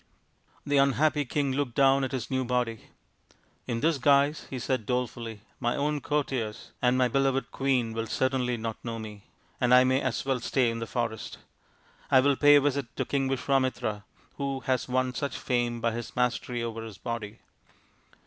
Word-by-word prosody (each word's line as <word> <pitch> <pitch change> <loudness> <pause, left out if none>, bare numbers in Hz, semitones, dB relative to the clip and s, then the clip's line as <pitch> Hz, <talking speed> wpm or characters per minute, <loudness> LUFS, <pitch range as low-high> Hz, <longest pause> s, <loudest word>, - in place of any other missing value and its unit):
The 145 0 +2
unhappy 145 +2 +3
king 140 +1 0
looked 130 -3 -2
down 135 0 +4
at 130 - -2
his 130 -3 -4
new 130 0 +1
body. 120 -3 -1 0.4
" - - -34
In 115 -1 -2
this 160 -3 +2
guise/' 140 +3 +3
he 130 - -4
said 125 -2 -2
dolefully, 115 -3 -3
" - - -36
my 120 -1 0
own 150 0 -1
courtiers 130 -7 -2
and 125 0 +3
my 130 -1 +4
beloved 135 +1 0
queen 130 -4 0
will 115 0 -3
certainly 130 0 0
not 110 -1 -5
know 115 -1 -4
me, 105 -2 -9 0.3
and 125 0 +5
I 125 - +7
may 130 +1 +2
as 130 -3 -2
well 135 -2 0
stay 120 0 +1
in 115 - -4
the 115 - -4
forest. 115 -2 -3 0.7
I 130 - +6
will 140 +1 +3
pay 145 +1 +6
a 145 - +6
visit 140 -2 0
to - - -1
King 135 -1 0
Visvamitra, 130 -5 0 0.4
who 140 -1 -2
has 130 0 -1
won 130 0 +1
such 140 +2 -3
fame 120 -2 -1
by 115 0 +1
his 115 +1 -6
mastery 125 -1 -1
over 115 -1 -4
his 110 -3 -9
body." 115 -2 -5
125 Hz, 185 wpm, -28 LUFS, 115-135 Hz, 0.7 s, I